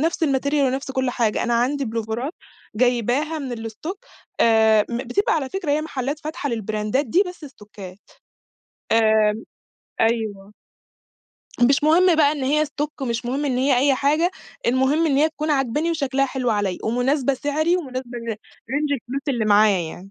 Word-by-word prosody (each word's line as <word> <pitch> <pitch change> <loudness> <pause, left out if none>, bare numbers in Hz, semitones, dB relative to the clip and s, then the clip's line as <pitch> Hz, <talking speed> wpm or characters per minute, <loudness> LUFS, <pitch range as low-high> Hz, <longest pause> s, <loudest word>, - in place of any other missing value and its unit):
نَفْس 325 +1 0
الmaterial 280 +1 +1
ونَفْس 265 +1 -2
كُلّ 260 -1 -1
حاجة، 230 -3 0
أنا 240 - 0
عندي 265 +4 +1
بُلوفَرات 230 +5 -3 0.4
جايباها 250 +6 +1
من 240 -5 -5
الstock 315 - -7 0.4
آآ، 220 -2 +5
م 235 - -2
بتبقى 270 - 0
على 285 -4 -1
فكرة 355 -1 -3
هي 300 - +1
محلات 285 -1 -4
فاتحة 310 -1 -4
للبراندات 215 +3 -1
دي 355 - +3
بس 360 -3 -9
ستوكّات، 210 -7 -12 0.9
آآ، 220 -1 +4 0.7
أيوه. 215 -3 -1 1.1
مش 270 +4 +4
مهم 340 +2 +5
بقى 295 -2 +4
إن 290 -3 -4
هي 300 +3 +2
stock 295 0 -5
مش 235 0 -2
مهم 270 +4 -2
إن 255 -3 0
هي 265 -1 +3
أي 275 +1 +3
حاجة، 305 +7 +2 0.4
المهم 265 +6 +2
إن 275 - +1
هي 300 +3 +4
تكون 310 0 -4
عاجباني 290 +4 0
وشكلها 275 -4 0
حلو 255 -2 -2
عليَّ، 205 -4 -1
ومناسبة 255 +4 +1
سعري 305 +5 0
ومناسبة 255 -6 -5
لر 230 -1 -4
لrange 285 +7 -4
الفلوس 270 +1 -4
اللي 240 -5 0
معايا 210 -1 +4
يعني. 175 +3 -7
265 Hz, 160 wpm, -22 LUFS, 230-295 Hz, 1.1 s, آآ